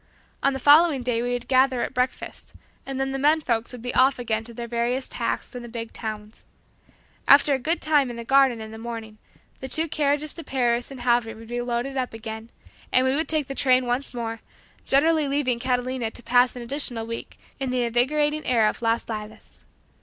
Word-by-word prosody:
On 275 - +2
the - - -2
following 290 0 +5
day 240 -2 0
we 245 0 -1
would 245 0 -4
gather 260 -1 +3
at - - -4
breakfast, 250 0 -3 0.3
and 270 -1 -4
then 270 0 -1
the 270 - -3
men 300 +3 +4
folks 235 -6 -1
would 245 -2 -9
be 245 - -3
off 265 +1 +4
again 225 -3 -2
to 235 - -6
their 235 +1 -6
various 240 +3 0
tasks - - -3
in 245 - -6
the 240 - -9
big 230 -1 -6
towns. 215 -1 -7 0.8
After 285 0 +7
a 265 - 0
good 325 +7 -1
time 295 -4 +3
in 240 - -6
the 235 - -6
garden 265 -2 +3
in 220 0 -8
the 220 - -9
morning, 225 -2 -7 0.4
the 265 - -6
two 320 +5 +3
carriages 295 0 +1
to 330 - -7
Paris 240 -3 0
and 270 -3 -9
Havre 240 -2 +1
would 225 0 -13
be 240 0 -2
loaded 245 +3 -3
up 250 -3 -2
again, 220 0 -7 0.4
and 255 - +3
we 260 +1 +2
would 315 +2 0
take 310 -2 0
the 275 - -5
train 255 -2 +3
once 245 +3 -2
more, 230 -2 -4 0.5
generally 310 +2 +3
leaving 275 -4 0
Catalina 250 -1 -1
to 240 - -5
pass 245 +1 +3
an 245 - -6
additional 240 -3 -2
week 230 0 -7 0.2
in 270 -1 -2
the 250 -1 0
invigorating 295 +6 +1
air 235 -3 +3
of 215 - -3
"Las 230 0 0
Lilas." 215 -1 -8
250 Hz, 215 wpm, -24 LUFS, 235-275 Hz, 0.8 s, After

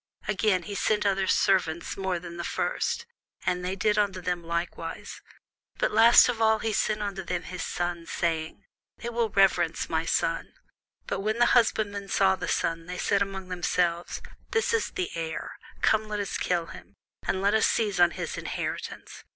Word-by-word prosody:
Again, 195 -2 +2
he 205 - -6
sent 210 +1 +1
other 195 -1 +2
servants 170 -5 +2
more 190 -2 -1
than 170 0 -8
the 170 - -4
first: 465 - -1 0.4
and 180 0 0
they 185 +1 -2
did 210 +1 +2
unto 200 -2 +1
them 175 -1 -2
likewise. 170 0 -4 0.6
But - - +1
last 225 +2 +8
of 235 -2 -2
all 220 0 +5
he 220 0 -2
sent 210 +1 0
unto 195 -2 -3
them 180 0 -3
his 180 0 -6
son, 175 -1 -3
saying, 165 +2 -2 0.3
They 235 - -5
will 235 -1 0
reverence 190 -5 +2
my 160 0 +1
son. 165 0 0 0.5
But - - -2
when 215 +3 -1
the 240 - +5
husbandmen 205 -4 +2
saw 190 -1 +3
the - - -5
son, 165 0 -1
they 180 0 -5
said 200 +2 +1
among 190 -2 -3
themselves, 175 -1 -1 0.3
This 455 0 +1
is 455 - +1
the 370 -2 -3
heir; 165 -1 -5 0.2
come, 220 0 +3
let 210 -1 -3
us 200 - -3
kill 175 -2 0
him, - - -12 0.3
and 190 - +1
let 200 +2 +2
us 220 - +4
seize 205 -4 0
on 175 -1 +7
his - - -5
inheritance. - - -5
190 Hz, 180 wpm, -27 LUFS, 175-210 Hz, 0.6 s, last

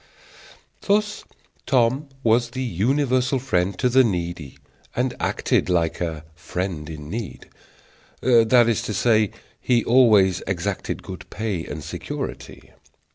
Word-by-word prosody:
Thus 210 +1 0 0.4
Tom 130 +3 +2
was 115 +1 +3
the 130 +2 -4
universal 130 - +1
friend 95 -7 -1
to 125 - +2
the 130 +1 +5
needy, 85 - -3 0.4
and - - 0
acted - - 0
like 85 -2 0
"a 80 -3 -3
friend 85 -1 -4
in 75 -2 -8
need"; 110 +4 -6 0.7
that 120 -1 +5
is 115 -3 +1
to 105 - -4
say, 110 -1 +3 0.3
he 120 -3 +2
always 110 -7 +4
exacted 95 +1 -3
good - - -9
pay 105 -6 -3
and 80 - -6
security. 75 - -7
110 Hz, 125 wpm, -23 LUFS, 90-125 Hz, 0.7 s, the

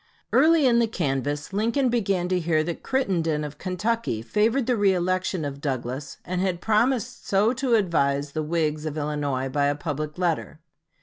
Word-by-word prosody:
Early 320 -2 +5
in 235 -2 +4
the 230 - +3
canvass 145 - -2
Lincoln 230 +6 +1
began 195 -7 0
to 185 -1 +1
hear 160 -2 +1
that 170 +1 -4
Crittenden, 170 - 0
of 150 0 -7
Kentucky, 185 - -2
favored 225 - +1
the 250 - +2
reëlection 185 -5 +1
of 140 0 -7
Douglas, 130 0 -4
and 180 0 -2
had 185 -2 0
promised 240 +4 0
so 205 +4 +3
to 260 -2 +1
advise 145 -8 +1
the 155 - -2
Whigs 155 -1 -1
of 155 0 -4
Illinois 145 -3 -1
by 140 +2 +1
a 145 - +1
public 150 0 -4
letter. 170 -3 -1
175 Hz, 170 wpm, -25 LUFS, 150-220 Hz, -, Early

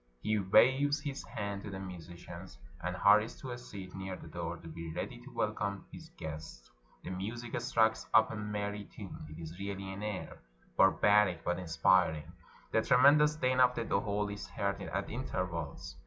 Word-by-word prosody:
He 110 0 +2
waves 135 +9 +4
his 140 -1 -4
hand 100 -1 -4
to 100 - -7
the 95 - -5
musicians, 90 -1 -9 0.3
and 90 +1 -2
hurries 105 +4 +5
to 130 - -6
a 120 - -4
seat 95 -6 -9
near 95 -1 -5
the - - -11
door, 85 0 -4
to 85 - -12
be 80 0 -6
ready - - -4
to - - -12
welcome 100 -1 -2
his - - -10
guests; 80 0 -8 0.3
the - - -5
music 110 +6 -4
strikes 110 -1 +2
up 110 0 +5
a - - -4
merry 105 -1 -3
tune 95 -5 -9
(it 75 +1 -9
is 85 +2 -8
really 100 -1 -4
an 100 - -7
air 105 -3 -4 0.2
— - - -32
bar 95 - +7
baric, 105 -5 +3
but 90 +1 0
inspiriting); 80 -2 +2 0.4
the 110 - +3
tremendous 145 +6 +6
din 130 -3 +1
of 125 -1 +5
the 115 - -2
dohol 100 0 0
is 100 - -7
heard 100 -1 -2
at 100 +1 -3
intervals. 90 - -4
100 Hz, 185 wpm, -33 LUFS, 90-110 Hz, 0.4 s, bar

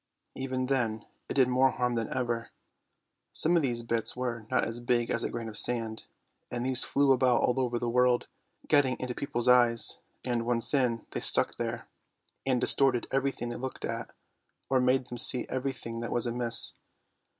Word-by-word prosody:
Even 130 -1 -4
then 115 -5 -2 0.2
it - - -4
did 130 -2 +4
more 130 +1 +3
harm 125 -1 -2
than 115 -2 -3
ever. 120 -2 -3 0.8
Some 170 +3 +3
of 170 - +3
these 120 -4 -1
bits 115 -1 -2
were 120 -3 -5
not 130 - +1
as 115 +1 -3
big 120 -1 -1
as 115 - 0
a - - -2
grain 115 -1 -6
of 105 -1 0
sand, 115 -2 +2 0.5
and 120 0 -4
these 130 -1 +5
flew 140 -1 +1
about 125 -2 +2
all 125 +1 0
over 125 -2 -1
the 120 - -3
world, 125 +1 +1 0.4
getting 145 -4 +2
into 125 -1 -4
people's 125 -3 -3
eyes, 120 -2 +3 0.3
and, 120 -2 -1
once 115 +2 +1
in, 125 -5 0
they - - -4
stuck - - +2
there, - - -5 0.6
and 130 -2 +1
distorted 130 -1 +4
everything 135 -3 -2
they 120 - -6
looked 130 +1 -6
at, 115 0 -6 0.6
or 130 -1 +3
made 125 0 +1
them 120 0 -4
see 125 0 +7
every 130 +1 -2
thing 115 -3 -6
that 120 - -5
was 120 - 0
amiss. 120 -1 +2
125 Hz, 185 wpm, -28 LUFS, 115-130 Hz, 0.8 s, see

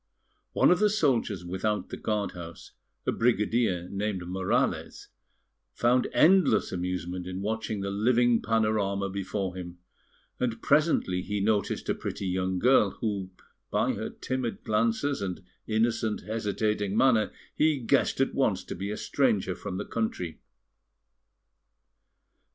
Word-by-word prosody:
One - - +5
of 180 - +4
the 210 0 +4
soldiers 125 - +1
without 95 +4 -2
the - - -5
guard 105 -2 -1
house, 85 -1 -10 0.3
a - - +2
brigadier 110 -5 +1
named 100 -2 -3
Morales, 95 0 -1 0.6
found 125 +1 +2
endless 185 +1 +4
amusement 90 0 -3
in 95 +1 -5
watching 110 -1 -2
the 100 0 -2
living 120 +3 +3
panorama 105 -3 0
before 95 -1 -3
him; 90 -1 -7 0.6
and 115 -2 -1
presently 145 - +2
he 105 +2 -3
noticed 105 0 0
a - - +2
pretty - - -5
young 95 0 -1
girl, 110 -2 +4
who, 100 -4 -2 0.4
by - - +1
her - - -4
timid 130 -3 -4
glances 115 +4 0
and 95 -1 -4 0.2
innocent, 110 0 0
hesitating 105 -1 -1
manner, 115 -5 +4 0.2
he 155 -1 +3
guessed 120 -4 +1
at - - +2
once - - +1
to - - -6
be 100 +3 -4
a 105 - -3
stranger - - +1
from 95 - -6
the - - -4
country. 110 -7 -3
105 Hz, 135 wpm, -28 LUFS, 95-115 Hz, 0.6 s, One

